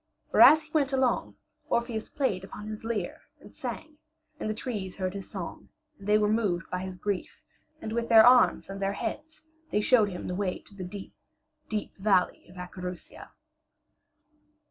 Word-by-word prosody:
For - - +4
as 310 0 +9
he 305 - -18
went 285 -3 +1
along 260 -2 +1 0.3
Orpheus 235 -2 -1
played 200 -10 -1
upon 210 +2 -9
his 215 0 -6
lyre 220 -6 -3 0.2
and - - -15
sang, 310 -1 -7 0.4
and - - -3
the - - 0
trees 210 -6 -4
heard 185 -1 -2
his 200 -1 -7
song - - -7 0.3
and 200 - -10
they 210 0 +5
were 210 -1 +2
moved 205 -6 0
by 185 - -1
his 185 0 -6
grief, 200 +1 -4 0.4
and 220 - -6
with 235 0 -1
their 225 -1 +9
arms 250 0 +5
and 195 0 -7
their 195 0 0
heads 305 +9 -5 0.3
they 210 - +1
showed 215 -2 +4
him 180 -2 -6
the - - -3
way 185 -1 -1
to - - -18
the 195 -2 -7
deep, 190 +2 -8 0.6
deep 215 -2 -3
valley 195 -2 +1
of 180 - -15
Acherusia. 180 0 -8
210 Hz, 180 wpm, -28 LUFS, 190-235 Hz, 0.6 s, as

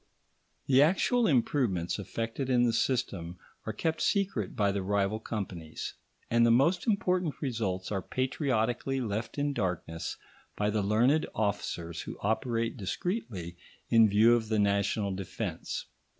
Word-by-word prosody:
The 135 0 +5
actual 195 +9 +3
improvements 115 - +1
effected 115 +6 -3
in 125 -2 +4
the 115 - +2
system 95 -8 -1 0.3
are - - 0
kept 160 -1 -2
secret 190 - 0
by 100 -1 +2
the 100 0 -2
rival 100 +2 0
companies, 95 -8 -5 0.3
and 115 0 +3
the 120 - +5
most 150 - +3
important 180 -6 +1
results 105 -9 -2
are 95 -2 -1
patriotically 130 - -1
left 110 0 -3
in 145 0 0
darkness 90 -7 -3 0.4
by 105 0 +1
the 105 0 +1
learned 120 +10 +3
officers 95 -5 -2
who - - -7
operate 115 +2 0
discreetly 95 - -3 0.3
in 115 -2 +7
view 110 +4 +6
of 115 -2 0
the 110 - +1
national 100 0 +1
defence. 95 -1 -4
110 Hz, 135 wpm, -30 LUFS, 100-135 Hz, 0.4 s, in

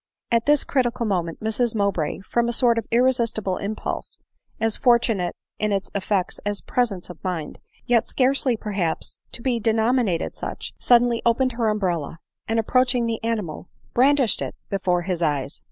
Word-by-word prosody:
At 230 +1 +2
this 295 -1 +4
critical 240 -3 0
moment 175 -5 -2
Mrs 220 +1 0
Mowbray, 195 -5 0
from 235 +4 0
a - - -1
sort 235 -1 +3
of 225 - -7
irresistible 230 -5 +1
impulse, 210 +2 -4 0.4
as 225 -1 +1
fortunate 230 -7 +2 0.2
in 215 -1 0
its 195 -1 -2
effects 195 -1 -1
as 205 0 -2
presence 205 -8 -1
of 175 - -14
mind, 175 -5 -4 0.3
yet 235 -2 +2
scarcely 260 -2 +2
perhaps 195 -7 -2
te 235 - -8
be 245 -3 +1
denominated 225 -3 +1
such, - - -6
suddenly 240 -1 +4
opened 255 +2 +2
her 230 -2 0
umbrella; 175 -7 -1 0.3
and, 225 - 0
approaching 250 +1 +2
the 225 -1 -3
animal, 210 -8 -3 0.2
brandished 265 -1 +4
it - - -4 0.2
before 180 -3 +1
his 180 -1 -2
eyes. 145 -3 -1
220 Hz, 155 wpm, -23 LUFS, 190-240 Hz, 0.4 s, this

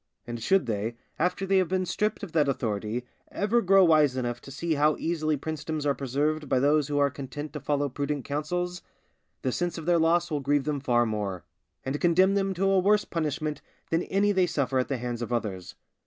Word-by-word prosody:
And 120 -1 -6
should 190 - +3
they, 110 0 -2 0.2
after 180 +4 0
they 195 0 +3
have 185 - +1
been 185 +1 0
stripped 210 +4 -1
of 195 - -6
that 150 -3 +2
authority, 110 -1 -2 0.3
ever 215 +4 +1
grow 195 -1 +5
wise 150 -5 +4
enough 120 -1 -2
to - - -12
see 160 +5 -2
how 150 +1 +3
easily 155 -2 -1
princedoms 155 +1 -4
are 140 - +3
preserved 145 +3 -1
by - - +3
those 145 +2 +3
who 145 -1 -1
are 140 -1 +3
content 140 +2 -7
to 150 - -4
follow 145 +1 0
prudent 140 +1 -3
counsels, 175 +5 -2 0.6
the 130 - +1
sense 175 +5 -2
of 165 - -6
their 175 0 +3
loss 165 +1 +2
will 150 - 0
grieve 145 0 +1
them 150 0 -1
far 120 -3 +2
more, 105 -5 -3 0.4
and 135 +2 -2
condemn 185 +3 +4
them 195 -1 0
to 190 +3 0
a 195 -1 +4
worse 205 +3 +3
punishment 155 -2 -2 0.3
than 165 +1 +2
any 200 +1 +2
they 190 -2 +3
suffer 135 -5 0
at 130 - 0
the 135 - -2
hands 120 -1 -4
of 120 - -4
others. 100 -7 -3
150 Hz, 215 wpm, -27 LUFS, 130-175 Hz, 0.6 s, grow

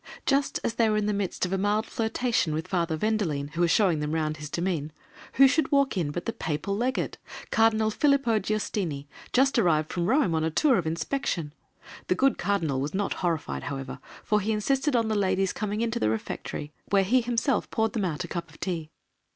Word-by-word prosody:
Just 275 0 +1
as 230 - 0
they 230 -1 +2
were 215 - +2
in 210 - 0
the 210 - +1
midst 200 -2 -1
of 180 - -3
a 195 - 0
mild 210 +2 +1
flirtation 225 -8 0
with 160 - -3
Father 170 -3 0
Vendelene, 165 -9 -1
who 165 +3 -3
was 170 - +4
showing 175 -4 +3
them 150 +1 -2
round 155 -1 -1
his 150 -1 -7
demesne, 170 -4 -2 0.4
who 275 - +7
should 275 +1 +1
walk 280 -3 +3
in 170 -6 0
but 175 +4 -4
the 230 - -2
Papal 160 -1 -2
Legate, 250 +5 -1 0.3
Cardinal 220 -1 +3
Filippo 275 -3 +2
Giustini, 195 -9 -2 0.3
just 270 0 +3
arrived 155 -6 +2
from 175 -1 -1
Rome 265 - +3
on 160 0 +1
a 160 - +1
tour 255 - +3
of 165 - -3
inspection! 165 - -2 0.5
The 180 - +2
good 270 +7 +2
cardinal 165 -9 0
was 150 +6 -3
not 200 +1 0
horrified, 155 - -2
however, 135 -1 -5 0.2
for 210 -1 +2
he 215 +3 -1
insisted 265 +6 +1
on 230 -2 +2
the 220 - 0
ladies 195 -2 +1
coming 210 0 -2
into 230 -1 -1
the 110 - +2
Refectory, 130 +6 -4 0.2
where 200 -1 +4
he 245 +7 +3
himself 240 +3 0
poured 220 0 0
them 215 -5 0
out 165 -1 -2
a - - -6
cup 170 -1 -5
of 150 - -17
tea. 165 -5 -3
195 Hz, 210 wpm, -27 LUFS, 160-225 Hz, 0.5 s, who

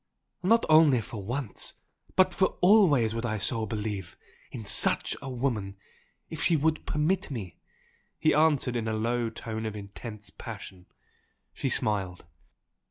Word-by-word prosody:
"Not 225 +5 +3
only 155 -5 +6
for 110 -1 -7
once 120 +2 -3 0.4
but 185 -1 +4
for 190 - +1
always 175 - +5
would 115 +1 -3
I 110 -2 -1
so 110 +3 0
believe! 105 -3 -4 0.3
in 115 -3 -8
SUCH 105 - +3
a 135 - -6
woman 120 -6 -2 0.5
if 160 - -7
she 170 - +4
would 155 +1 0
permit 175 +5 0
me!" 105 - -7 0.6
he 155 - +2
answered 150 -5 +2
in 115 -2 -2
a 110 - -1
low 115 +2 0
tone 110 0 -6
of 110 - -5
intense 105 +1 -9
passion. 100 -6 -9 0.7
She - - -2
smiled. 95 -4 -1
115 Hz, 145 wpm, -28 LUFS, 105-150 Hz, 0.7 s, only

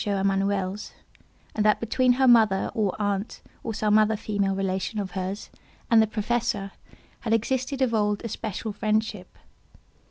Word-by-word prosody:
Emanuel's, 195 0 -1 0.6
and 215 - 0
that 210 0 +3
between 250 +2 +2
her 265 +1 +2
mother, 220 -5 +4
or 205 -4 0
aunt, 205 0 -2 0.2
or 225 - -3
some 215 0 +3
other 215 +1 +3
female 200 -2 -1
relation 195 +2 -2
of 195 -2 -4
hers, 190 +2 -5 0.4
and 225 -1 +7
the 220 - +3
Professor, 215 -2 -1 0.5
had 225 -2 -1
existed 260 +4 0
of 240 -3 0
old 210 0 0
a - - -1
special 220 0 -4
friendship. 215 -2 -2
210 Hz, 150 wpm, -25 LUFS, 195-225 Hz, 0.6 s, and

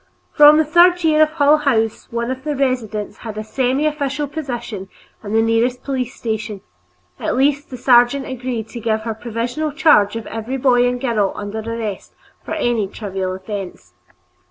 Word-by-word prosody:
From 300 0 +8
the 315 - +3
third 350 +3 +4
year 310 -1 +4
of 310 - +5
Hull 295 -1 +4
House, 225 -7 0
one 235 +1 -2
of 260 0 -6
the 300 -1 -2
residents 225 -6 -2
held 220 -2 -8
a - - -2
semiofficial 280 +4 -1
position 240 -10 -5 0.3
in 205 0 -5
the 225 0 +3
nearest 235 +3 +1
police 260 -2 -3
station; 215 -3 -4 0.6
at - - -2
least, 285 +2 +1
the 255 - -7
sergeant 245 +2 +4
agreed 250 -3 -4
to 235 - -7
give 220 -1 -1
her 225 0 -3
provisional 240 +7 -3
charge 285 -9 +4
of 230 - -5
every 225 +4 -4
boy 245 -2 +3
and 245 0 -1
girl 215 -6 0
under 205 +2 -5
arrest 220 -2 -5 0.3
for - - -4
a 230 -4 0
trivial 190 -2 -4
offense. 190 - -7
240 Hz, 170 wpm, -19 LUFS, 220-280 Hz, 0.6 s, From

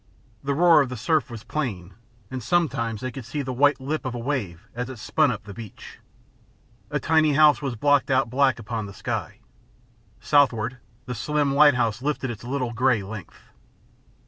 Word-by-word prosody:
The 140 0 -1
roar 165 -1 +6
of 135 - -1
the 125 - -5
surf 155 +6 +1
was 115 -2 -8
plain, 100 -12 -4 0.4
and 130 -1 -4
sometimes 120 - 0
they 130 - -3
could 135 +1 -8
see 140 +6 -4
the 130 -1 -4
white 145 +3 +3
lip 145 +4 -3
of 130 -2 -4
a - - -3
wave 115 - -3
as 125 +1 -4
it 130 - -8
spun - - +2
up - - -5
the 100 -1 -9
beach. 110 -2 -11 0.9
A - - -1
tiny 155 -2 +3
house 150 +1 +5
was 135 -4 -3
blocked 145 +5 +2
out 130 -2 +2
black 130 +2 +2
upon 115 -1 -5
the 100 - -11
sky. - - -4 0.8
Southward, 130 -4 +2 0.3
the 125 - -4
slim 145 +4 0
lighthouse 125 -6 +4
lifted 140 -3 -2
its 115 - -9
little 125 -1 -2
grey 120 -3 +2
length. 100 -1 -10
130 Hz, 180 wpm, -24 LUFS, 115-145 Hz, 0.9 s, roar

